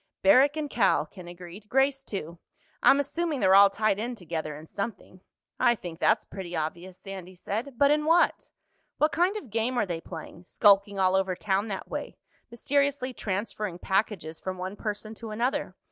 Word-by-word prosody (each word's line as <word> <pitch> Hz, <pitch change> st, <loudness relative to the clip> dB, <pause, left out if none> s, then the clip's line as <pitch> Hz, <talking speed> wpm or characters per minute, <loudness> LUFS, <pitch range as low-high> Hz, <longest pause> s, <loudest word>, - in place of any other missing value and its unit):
"Barrack 290 Hz, +1 st, +6 dB
and 305 Hz, -1 st, -2 dB
Cal," 230 Hz, -8 st, +2 dB
Ken 180 Hz, -3 st, -12 dB
agreed. 175 Hz, +4 st, -11 dB
"Grace 270 Hz, +1 st, +2 dB
too. 170 Hz, -, -6 dB, 0.4 s
I'm 275 Hz, -, +6 dB
assuming 305 Hz, +1 st, -1 dB
they're 190 Hz, -, +4 dB
all 200 Hz, +1 st, +8 dB
tied 205 Hz, 0 st, 0 dB
in 240 Hz, +3 st, -3 dB
together 160 Hz, -6 st, -5 dB
in 155 Hz, -, -11 dB
something." 195 Hz, -1 st, -6 dB, 0.4 s
"I 240 Hz, -1 st, +4 dB
think 175 Hz, -5 st, -8 dB
that's -, -, +3 dB
pretty 180 Hz, -3 st, -7 dB
obvious," 170 Hz, +4 st, -4 dB
Sandy 190 Hz, -2 st, -9 dB
said. 230 Hz, +8 st, -4 dB
"But 280 Hz, +2 st, +5 dB
in 300 Hz, 0 st, +2 dB
what? 335 Hz, +2 st, +3 dB, 0.5 s
What 305 Hz, -, +3 dB
kind 360 Hz, +5 st, +1 dB
of 265 Hz, -, -9 dB
game 230 Hz, +3 st, 0 dB
are -, -, +2 dB
they 170 Hz, -3 st, -4 dB
playing—skulking 195 Hz, +5 st, +1 dB
all 185 Hz, -1 st, +3 dB
over 190 Hz, -1 st, +1 dB
town 200 Hz, +2 st, 0 dB
that 195 Hz, -3 st, -5 dB
way, -, -, -6 dB, 0.3 s
mysteriously 275 Hz, +2 st, 0 dB
transferring 200 Hz, -3 st, -3 dB
packages 190 Hz, -4 st, -1 dB
from 185 Hz, 0 st, -5 dB
one 185 Hz, +2 st, -5 dB
person 215 Hz, +1 st, -5 dB
to 225 Hz, 0 st, -8 dB
another? 235 Hz, +5 st, -1 dB
205 Hz, 175 wpm, -27 LUFS, 185-255 Hz, 0.5 s, all